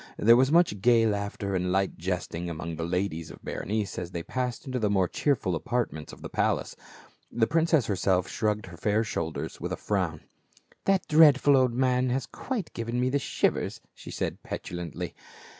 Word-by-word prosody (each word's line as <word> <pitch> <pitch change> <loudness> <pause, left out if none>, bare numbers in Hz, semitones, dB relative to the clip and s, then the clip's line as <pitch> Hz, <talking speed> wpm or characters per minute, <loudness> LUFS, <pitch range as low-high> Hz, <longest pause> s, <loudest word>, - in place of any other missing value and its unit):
There 115 +2 +6
was 130 +3 +4
much 165 - +3
gay 115 0 +5
laughter 100 -1 -2
and 90 -1 0
light 95 +1 +1
jesting 85 -1 -3
among 85 0 -5
the 80 - -4
ladies 85 -2 -2
of - - -12
Berenice, 105 -1 -3
as 90 -1 -5
they 85 -2 -5
passed 125 +2 -3
into 130 -2 -2
the 105 -3 +1
more 95 -3 +2
cheerful 125 -9 0
apartments 85 -5 -2
of - - -13
the - - -4
palace; - - 0 0.6
the 115 -1 +2
princess 160 -1 +2
herself 95 -2 +1
shrugged 105 -1 -1
her 90 -2 -11
fair 105 +5 +1
shoulders 85 -7 -4
with - - -3
a - - -2
frown. - - -1 0.3
" - - -31
That 195 -1 +2
dreadful 145 -2 +6
old 130 -3 +3
man 130 0 +2
has 130 +2 -1
quite 240 -9 -5
given 115 +1 -3
me 125 +1 +1
the 140 - +2
shivers," - - 0
she - - -12
said - - -3
petulantly. 85 -3 -5
110 Hz, 185 wpm, -28 LUFS, 90-130 Hz, 0.6 s, There